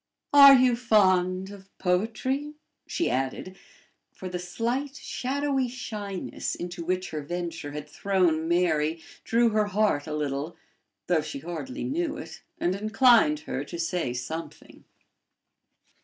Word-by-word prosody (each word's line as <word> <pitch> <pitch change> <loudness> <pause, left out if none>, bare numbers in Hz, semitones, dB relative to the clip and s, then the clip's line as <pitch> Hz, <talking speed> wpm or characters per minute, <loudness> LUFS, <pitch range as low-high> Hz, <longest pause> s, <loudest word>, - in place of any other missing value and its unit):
"Are 280 -1 +10
you 250 -2 +4
fond 190 -5 +2
of 195 -1 -13
poetry?" 230 +10 -1 0.3
she 340 - -1
added; 135 +8 -2 0.6
for 185 - -8
the 180 0 -4
slight, 240 +10 -3
shadowy 275 0 -1
shyness, 210 -6 -5
into 175 0 -6
which 185 +2 -2
her 155 -1 -3
venture 165 -1 -5
had 150 0 -6
thrown 175 -3 +1
Mary, 165 -2 +1 0.2
drew 235 0 +3
her 215 -1 +2
heart 205 -7 +1
a 155 - -3
little, 145 +2 -3 0.5
though 175 -3 +2
she 150 - -6
hardly 175 - -6
knew 320 +2 -2
it, - - -9 0.2
and 175 - 0
inclined 215 - +4
her 135 -2 -4
to 170 - -7
say 170 -4 -1
something. 125 +7 -7
185 Hz, 130 wpm, -27 LUFS, 165-235 Hz, 0.6 s, Are